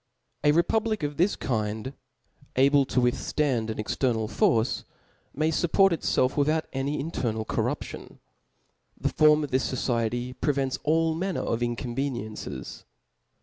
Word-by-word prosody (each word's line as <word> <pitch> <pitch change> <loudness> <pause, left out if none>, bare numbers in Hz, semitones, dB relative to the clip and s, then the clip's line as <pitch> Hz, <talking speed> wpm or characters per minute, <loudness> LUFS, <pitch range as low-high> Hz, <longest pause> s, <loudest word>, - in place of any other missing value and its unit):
A 150 - +5
republic 215 +5 +1
of 145 0 -3
this 185 +5 +3
kind, 110 +1 -2 0.6
able^to 135 0 +4
withftand 125 -1 0
an 110 - -4
ex 105 - -2
ternal 115 -5 0
force, 110 +2 +1 0.5
may 155 +3 0
fupport 185 +4 +3
itfelf 130 -4 +1
without 155 +2 +1
any 140 +3 -1
inter 140 -5 -2
<3al 110 0 -4
corruption; - - -3 0.8
the - - 0
form 155 0 +4
of 145 - -5
this 130 +1 +1
fociety 120 -1 -1
prevents 135 -3 0
all 160 +1 +2
manner 185 +2 -2
of 115 - -1
incoveniencies. 120 - -4
135 Hz, 130 wpm, -27 LUFS, 120-155 Hz, 0.8 s, A